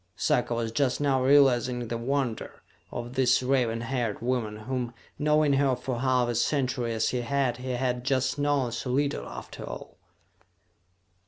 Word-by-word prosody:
Sarka 120 -1 +1
was 115 -1 -2
just 130 +1 +1
now 140 -3 +2
realizing 130 -3 +4
the 115 - -3
wonder 130 -1 -2 0.3
of 120 0 -5
this 130 -1 +3
raven 125 -3 +1
haired 115 -3 -2
woman 115 -3 -1
whom, 125 0 -3 0.2
knowing 150 -1 +3
her 135 -1 +3
for 125 -1 -4
half 130 -1 +2
a 120 - -1
century 125 -1 0
as 110 0 +1
he 125 - -1
had, 130 -1 0
he 130 +1 -6
had 125 0 -1
just 130 +1 0
known 145 -4 +1
so 120 +2 -4
little 140 +3 0
after - - -9
all. - - -8
125 Hz, 160 wpm, -27 LUFS, 120-135 Hz, 0.3 s, realizing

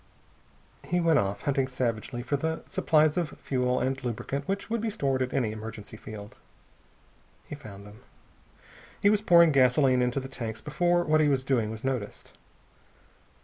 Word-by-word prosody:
He 175 - 0
went 165 -3 +4
off, 100 0 -2
hunting 135 -2 +1
savagely 120 -1 -3
for 145 - -1
the 160 +3 -2
supplies 155 0 +2
of 170 -3 -2
fuel 125 -1 0
and 130 0 -2
lubricant 130 +4 -4
which 195 +1 -2
would 230 0 -2
be 225 - -1
stored 135 -10 -1
at 130 0 -1
any 120 -5 0
emergency 110 0 -8
field. 105 -1 -10 1.1
He - - -9
found 105 -9 -10
them. 105 +1 -13 1.0
He 205 - +4
was 210 -1 +2
pouring 170 -5 +6
gasoline 130 -1 +4
into 125 +2 0
the 135 - -6
tanks 115 -4 -5
before 175 +4 +1
what 155 -1 +3
he 150 - +3
was 135 -2 0
doing 120 -6 +1
was 110 0 -7
noticed. 130 -6 -4
135 Hz, 165 wpm, -28 LUFS, 115-155 Hz, 1.1 s, pouring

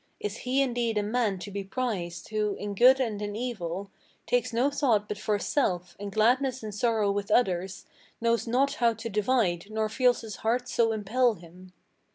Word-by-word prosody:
Is 210 +1 -4
he 260 +2 +1
indeed 240 -4 -1
a 210 - +1
man 215 -2 0
to 195 +3 -8
be 200 0 -4
prized, 190 -5 -4
who, 210 -2 -1
in 205 0 -5
good 255 +6 +6
and 220 -5 -1
in 205 0 -4
evil, 200 -5 -4 0.3
Takes 245 -1 +1
no 245 +5 +2
thought 235 -8 +1
but 210 -1 -5
for 210 -1 0
self, 180 - -1
and 200 0 -5
gladness 250 +4 +2
and 215 -1 -5
sorrow 215 -1 +1
with 200 0 -3
others 190 -5 +1 0.3
Knows 230 0 +1
not 260 +4 +2
how 230 -1 +4
to 230 - -6
divide, 210 -4 +1
nor 215 0 -1
feels 250 +2 +2
his 220 -3 -7
heart 245 +3 0
so 230 -2 +2
impel 220 +3 +1
him? 180 +1 -15
215 Hz, 190 wpm, -28 LUFS, 200-245 Hz, 0.3 s, good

